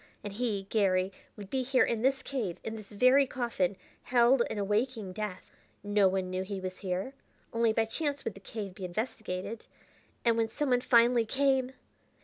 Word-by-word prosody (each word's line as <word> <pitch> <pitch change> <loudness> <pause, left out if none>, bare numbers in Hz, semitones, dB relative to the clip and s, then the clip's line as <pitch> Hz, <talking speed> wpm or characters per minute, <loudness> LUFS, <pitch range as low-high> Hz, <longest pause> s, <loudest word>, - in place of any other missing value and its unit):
And 205 -1 -5
he, 210 -3 -1
Garry, 190 -3 +2 0.3
would 200 -2 -9
be 265 - +1
here 255 0 +3
in 230 -2 0
this 265 +2 +2
cave, 225 -11 -3
in 225 - -4
this 215 -2 -10
very 255 +6 +5
coffin, 230 -8 -1 0.3
held 245 +1 +4
in - - -4
a 205 - 0
waking 210 -1 -1
death. 205 -3 -5 0.3
No 205 -1 +4
one 185 -1 -1
knew 185 0 -1
he 195 +1 -4
was 185 0 -6
here; 190 +6 -3 0.4
only 230 -1 +3
by 225 +1 +2
chance 285 +4 -3
would 225 - -2
the 195 - -12
cave 200 -1 -6
be 190 - -10
investigated. 215 +1 -4 0.6
And 230 -1 +4
when 225 -1 +1
someone 250 0 +1
finally 235 -1 +4
came! 265 0 +2
220 Hz, 180 wpm, -30 LUFS, 195-250 Hz, 0.6 s, very